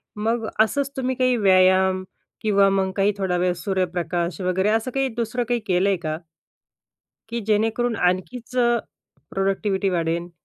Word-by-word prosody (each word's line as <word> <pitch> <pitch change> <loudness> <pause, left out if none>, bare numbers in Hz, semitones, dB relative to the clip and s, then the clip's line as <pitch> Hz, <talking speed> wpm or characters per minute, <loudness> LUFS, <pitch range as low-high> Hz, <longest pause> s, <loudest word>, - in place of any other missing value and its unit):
मग 225 +2 -1 0.2
असंच 275 +5 -1
तुम्ही 260 0 -1
काही 255 0 +2
व्यायाम 185 -1 +4 0.4
किंवा 200 -2 +4
मग 195 -1 0
काही 200 +1 +2
थोडा 190 -3 0
वेळ 180 0 +1
सूर्यप्रकाश 175 -1 -2
वगैरे 185 +2 +1
असं 225 +3 0
काही 270 +1 0
दुसरं 240 +1 -1
काही 240 -1 +1
केलंय 190 +1 +2
का? 155 0 -2 1.1
की 235 0 -2
जेणेकरून 225 +2 +1
आणखीचं 235 +6 0 0.5
प्रोडक्टिव्हिटी 195 0 0
वाढेल? 170 0 -1
195 Hz, 130 wpm, -23 LUFS, 185-230 Hz, 1.1 s, व्यायाम